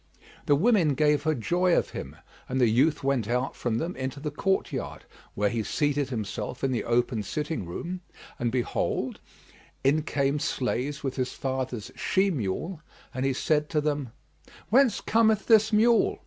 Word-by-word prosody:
The 145 - +5
women 175 - +3
gave 150 +1 +3
her 155 -1 +2
joy 175 - +2
of - - 0
him, - - -7 0.3
and 130 - -1
the 125 - +5
youth 135 +8 +2
went 135 -6 +1
out 125 +3 -1
from 115 -2 -1
them 170 +8 -3
into 130 +2 -4
the 150 +1 -4
court 190 +6 0
yard - - -5 0.3
where 105 0 +1
he 115 -1 -1
seated 145 +3 0
himself 110 +1 -4
in 135 - +2
the 120 - -1
open 120 -1 +1
sitting 150 - -3
room; 175 - -5 0.4
and 120 -1 0
behold, 125 -1 -1 0.6
in 145 +3 +3
came 140 -2 0
the 145 - -3
slaves 140 +3 -2
with 135 -1 -3
his 130 -1 -1
father's 130 -4 -3
she 195 +1 +1
mule, 150 - -3 0.3
and 130 +1 -1
he 135 - +1
said 150 +3 +1
to 155 - +1
them, 145 -3 -1 0.6
"Whence 255 +1 +4
cometh 220 -2 +3
this 220 -2 +5
mule?" 225 +2 +4
140 Hz, 175 wpm, -27 LUFS, 125-165 Hz, 0.6 s, The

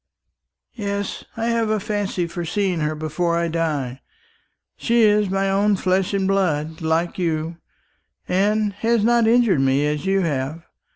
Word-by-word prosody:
"Yes, 200 -3 -4
I 225 - -1
have 230 -2 +1
a 215 0 +1
fancy 205 -3 -2
for 170 +1 -5
seeing 185 0 -1
her 155 0 -1
before 155 +2 -1
I 170 0 0
die. 145 -6 -2 0.7
She 235 -1 +2
is 210 -2 +3
my 195 +1 0
own 200 +2 +2
flesh 185 0 0
and 195 -1 0
blood, 160 -5 0
like 165 +3 0
you, 165 -1 -2 0.7
and 205 +2 +1
has 225 +2 +1
not 235 0 +3
injured 230 - +4
me 135 +2 +2
as 150 +4 -2
you 195 0 +2
have. 150 0 -2
185 Hz, 155 wpm, -21 LUFS, 160-205 Hz, 0.7 s, injured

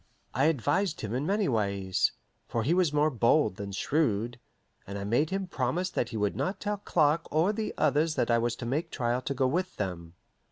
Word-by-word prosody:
I 135 +4 +2
advised 160 - +1
him 110 0 -4
in 135 +5 -1
many 205 0 +1
ways, 100 -5 +1 0.3
for 115 - -1
he 150 +9 +2
was 180 -4 +3
more 150 +1 +2
bold 120 -3 +3
than 100 -1 -5
shrewd, 120 - 0 0.5
and 100 +1 -5
I 100 - -4
made 120 +10 +1
him 195 0 -2
promise 175 +3 -1
that 120 - -1
he 115 - -4
would 105 -1 0
not 185 +3 -2
tell 210 0 -2
Clark 165 -4 +2
or 165 +7 +3
the 215 0 -2
others 155 +2 +2
that - - +1
I 115 - +4
was 120 0 0
to 120 - -7
make 150 +8 -1
trial 120 -2 -1
to 140 +2 -3
go 130 0 +2
with 180 +8 -1
them. 85 -4 -5
140 Hz, 210 wpm, -29 LUFS, 115-165 Hz, 0.5 s, I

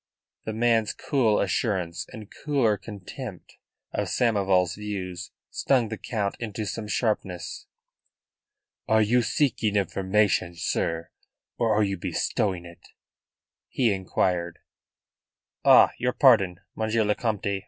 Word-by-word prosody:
The 110 - -3
man's 115 -1 +2
cool 120 -7 +1
assurance 95 -4 -1
and 110 -2 -10
cooler 135 -8 +2
contempt 100 -1 -9 0.4
of - - -1
Samoval's 95 -6 +2
views 95 -4 -5 0.2
stung 125 -5 +1
the 110 - -4
Count 100 -4 -2
into 110 -2 -4
some 105 +1 -4
sharpness. 100 -5 -2 1.2
"Are 110 0 +4
you 120 +4 +3
seeking 115 -5 0
information, 95 -2 +1
sir, 85 0 -2 0.5
or 115 -2 +2
are 105 - +4
you 100 -1 -1
bestowing 90 +1 -1
it?" 85 0 -13 0.9
he 120 -5 +2
inquired. 90 -2 -1 1.1
"Ah! - - +7
Your 125 0 0
pardon, 100 -10 +5 0.2
Monsieur 110 0 +1
le 105 0 +2
Comte. 100 -3 -2
105 Hz, 115 wpm, -26 LUFS, 95-110 Hz, 1.2 s, Ah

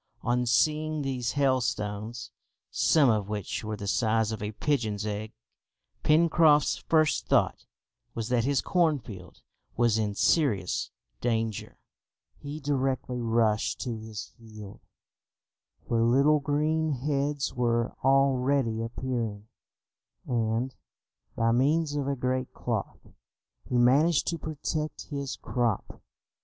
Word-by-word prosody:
On 125 0 0
seeing 155 +4 +1
these 130 -3 -2
hailstones, 120 -5 -1 0.4
some 155 -4 +4
of 105 -2 -1
which 105 0 -4
were 110 0 -4
the 100 - -6
size 110 +1 +1
of 110 - -5
a 105 0 -3
pigeon's 110 -5 -1
egg, 105 +1 -4 0.7
Pencroft's 155 -1 +4
first 155 -2 +1
thought - - +1 0.5
was 115 -2 -3
that 120 -2 +2
his 135 0 +1
cornfield 135 - -1 0.3
was 120 -2 +3
in 105 -2 -1
serious 105 - +1 0.3
danger. 115 -3 -2 0.6
He 145 +2 -6
directly 135 -3 -1
rushed 115 -2 +1
to 120 -4 -3
his 110 -2 -7
field, 110 -3 -11 1.0
where 115 -1 0
little 140 +6 +4
green 155 +2 0
heads 140 +1 -1
were 120 -1 0
already 135 -3 +2
appearing, 115 -3 -4 0.8
and, 115 +1 -1 0.6
by 115 0 +2
means 145 +5 +2
of 140 -2 -1
a 140 - 0
great 130 0 -2
cloth, - - -4 0.6
he 125 - +1
managed 140 +6 +4
to 170 - -3
protect 155 0 -4
his 140 -2 -3
crop. 120 -5 -2
125 Hz, 115 wpm, -28 LUFS, 110-145 Hz, 1.0 s, some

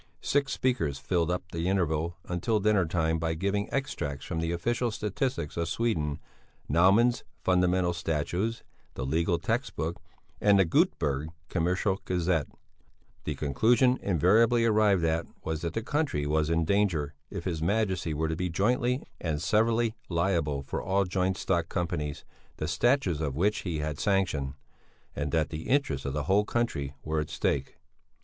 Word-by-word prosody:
Six 140 -1 +1
speakers 85 - 0
filled 85 +4 0
up 90 +1 -1
the 85 +1 -2
interval 85 -3 0
until 100 +5 0
dinner 105 -4 +3
time 80 -1 0
by 80 0 -1
giving 100 +4 -1
extracts 70 - -3
from 85 - -3
the 85 0 -1
official 120 +8 0
statistics 110 - -2
of 85 0 0
Sweden, 80 -12 0 0.5
Nauman's 100 - +4 0.2
Fundamental 90 -1 +2
Statutes, 85 +7 -2 0.3
the 65 - -3
Legal 85 +5 +1
Textbook 85 - -2 0.4
and 100 -1 +5
the 95 - +5
Göteberg 75 -3 +1 0.2
Commercial 95 +3 0
Gazette: 85 -4 0 0.8
the 75 - -2
conclusion 115 - +3
invariably 110 +7 +4
arrived 105 -5 +3
at 80 +1 0 0.2
was 80 -1 -3
that 85 0 -3
the 115 - -1
country 145 - 0
was 75 +1 +1
in 85 0 +2
danger 85 -6 +1 0.2
if 100 -4 -5
his 85 -4 -2
Majesty 95 -2 0
were 80 +2 0
to 80 - -1
be 90 +2 -2
jointly 120 +8 +1 0.2
and 80 -3 -2
severally 110 +6 +2 0.2
liable 85 -5 0
for - - -4
all 95 +1 +1
joint 95 +1 0
stock 85 -3 0
companies 75 -5 -3 0.3
the 80 - -2
statutes 95 - +2
of 70 -4 -2
which 100 +7 +1
he 85 -4 -3
had 75 -1 -3
sanctioned; 90 -10 0 0.6
and 75 0 -2
that 80 -1 +1
the 80 0 -5
interests 80 - +1
of 70 - -2
the 75 0 -1
whole 100 +7 +3
country 80 - -2
were 80 0 -1
at 75 - -3
stake. 70 -2 -1
85 Hz, 155 wpm, -28 LUFS, 80-105 Hz, 0.8 s, and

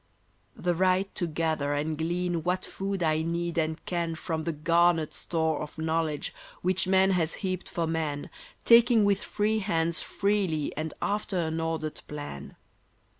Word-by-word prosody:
The 175 0 0
right 185 +2 +2
to 175 - -1
gather 155 -2 0
and 155 +2 -1
glean 170 +2 -1
What 180 +3 -1
food 195 -1 -3
I 155 -1 +2
need 170 +1 -1
and 160 0 -2
can 170 -2 -1
From 160 -1 -3
the 170 - 0
garnered 165 +1 +2
store 160 -2 0
of 150 - -7
knowledge 160 -1 -1 0.3
Which 185 +1 +2
man 190 0 +4
has 170 -3 +1
heaped 185 -1 -2
for 170 - -1
man, 155 -3 -2 0.3
Taking 235 -2 +7
with 200 -1 +2
free 215 +1 0
hands 170 -5 0
freely 195 -7 0
and 155 +1 -4
after 205 -2 -1
an 160 -1 -1
ordered 160 -1 -3
plan. 145 - -7
165 Hz, 155 wpm, -28 LUFS, 160-185 Hz, 0.3 s, Taking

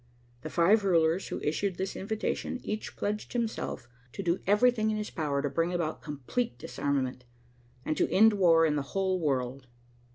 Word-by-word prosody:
The 155 - -6
five 195 +7 +4
rulers 170 -1 +2
who - - -4
issued 185 +5 -1
this 190 0 -3
invitation 220 +4 -3
each 215 0 -4
pledged 210 +1 -3
himself 230 - -3 0.3
to 195 - -5
do 170 0 +1
everything 220 +2 +4
in 215 - 0
his 210 0 -4
power 145 -4 -1
to - - +1
bring 170 +1 0
about 170 -3 -2
complete 145 - -3
disarmament, 130 0 -2 0.6
and 155 - 0
to - - +1
end 220 +2 +6
war 170 -5 +5
in 150 -2 +1
the - - 0 0.2
whole 190 -1 +1
world. 130 -4 -1
175 Hz, 170 wpm, -29 LUFS, 150-210 Hz, 0.6 s, end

